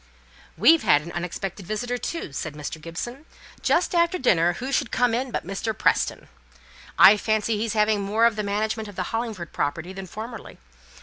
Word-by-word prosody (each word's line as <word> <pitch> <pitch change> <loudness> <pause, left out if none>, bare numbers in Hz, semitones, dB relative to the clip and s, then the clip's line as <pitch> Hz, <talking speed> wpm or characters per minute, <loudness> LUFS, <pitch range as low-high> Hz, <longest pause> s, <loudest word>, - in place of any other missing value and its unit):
"We've 310 - +6
had 145 0 +4
our 170 - -9
unexpected 180 +2 -5
visitor, 245 +4 -2
too," 330 - -5
said 150 +1 -5
Mr. 150 +1 -6
Gibson. 240 - -7 0.3
"Just 360 - +1
after 340 +1 +2
dinner, 175 - +3
who 260 +9 -5
should - - +1
come 245 -2 +1
in 255 +3 -1
but 235 - -4
Mr. 195 +3 -3
Preston. - - +1 0.7
I 205 +2 +9
fancy 220 +1 0
he's 225 -1 -1
having 210 -1 +2
more 210 +4 +2
of 235 -2 +3
the 210 - -2
management 215 +1 -2
of 205 - -12
the 185 - -2
Hollingford 220 -8 -4
property 170 +6 -2
than 190 0 -7
formerly. 220 +4 -8
215 Hz, 180 wpm, -24 LUFS, 180-235 Hz, 0.7 s, I